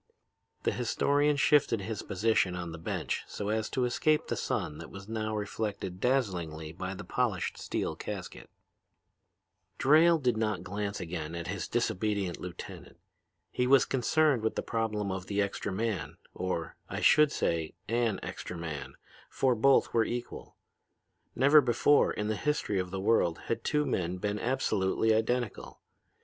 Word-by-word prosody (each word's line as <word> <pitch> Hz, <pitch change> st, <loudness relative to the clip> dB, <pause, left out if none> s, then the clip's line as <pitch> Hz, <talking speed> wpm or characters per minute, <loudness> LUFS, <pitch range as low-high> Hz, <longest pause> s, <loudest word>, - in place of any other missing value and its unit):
The -, -, +2 dB
historian 145 Hz, +5 st, +2 dB
shifted 140 Hz, -6 st, +3 dB
his 105 Hz, +1 st, -4 dB
position 95 Hz, -2 st, +1 dB
on 85 Hz, -2 st, -5 dB
the 80 Hz, -, -8 dB
bench -, -, -2 dB
so 100 Hz, -, -4 dB
as 110 Hz, 0 st, 0 dB
to 125 Hz, -, 0 dB
escape 150 Hz, +5 st, +2 dB
the -, -, -2 dB
sun 75 Hz, +1 st, -2 dB
that 85 Hz, -, -9 dB
was 100 Hz, 0 st, -10 dB
now 110 Hz, -1 st, -2 dB
reflected 100 Hz, -3 st, -4 dB
dazzlingly 90 Hz, -, -1 dB
by 95 Hz, +3 st, -5 dB
the 100 Hz, -, -7 dB
polished 115 Hz, -8 st, -1 dB
steel -, -, -2 dB
casket. -, -, -7 dB, 1.3 s
"Drayle 160 Hz, +4 st, +6 dB
did 125 Hz, -5 st, +1 dB
not 105 Hz, -5 st, -1 dB
glance 100 Hz, +2 st, -3 dB
again 80 Hz, -1 st, -5 dB
at 85 Hz, +1 st, -5 dB
his 95 Hz, -1 st, -3 dB
disobedient 105 Hz, -5 st, -1 dB
lieutenant. 90 Hz, -1 st, -8 dB, 0.5 s
He 125 Hz, -, 0 dB
was 135 Hz, +1 st, +6 dB
concerned 135 Hz, 0 st, +2 dB
with 110 Hz, -, -1 dB
the -, -, -2 dB
problem 105 Hz, -3 st, -1 dB
of 95 Hz, -1 st, -5 dB
the 100 Hz, 0 st, -1 dB
extra 100 Hz, 0 st, -1 dB
man, 95 Hz, -7 st, -2 dB, 0.2 s
or, 90 Hz, -3 st, -3 dB
I -, -, -3 dB
should 150 Hz, -1 st, +5 dB
say, 80 Hz, -2 st, -1 dB
an 115 Hz, -3 st, +1 dB
extra 90 Hz, -, -6 dB
man, 80 Hz, -4 st, -6 dB, 0.3 s
for 130 Hz, -2 st, +2 dB
both 135 Hz, +4 st, +3 dB
were 115 Hz, -, +4 dB
equal. 120 Hz, +2 st, -5 dB, 0.8 s
Never 140 Hz, +4 st, +7 dB
before 125 Hz, +3 st, +3 dB
in 105 Hz, -, -3 dB
the 110 Hz, -, 0 dB
history 125 Hz, -6 st, 0 dB
of 90 Hz, -1 st, -2 dB
the 95 Hz, +1 st, -4 dB
world 95 Hz, -5 st, +2 dB
had 115 Hz, -, -2 dB
two 150 Hz, -1 st, +1 dB
men 90 Hz, 0 st, -1 dB
been 105 Hz, +2 st, -2 dB
absolutely 110 Hz, -4 st, +1 dB
identical. 115 Hz, +1 st, -1 dB
105 Hz, 155 wpm, -30 LUFS, 90-120 Hz, 1.3 s, Never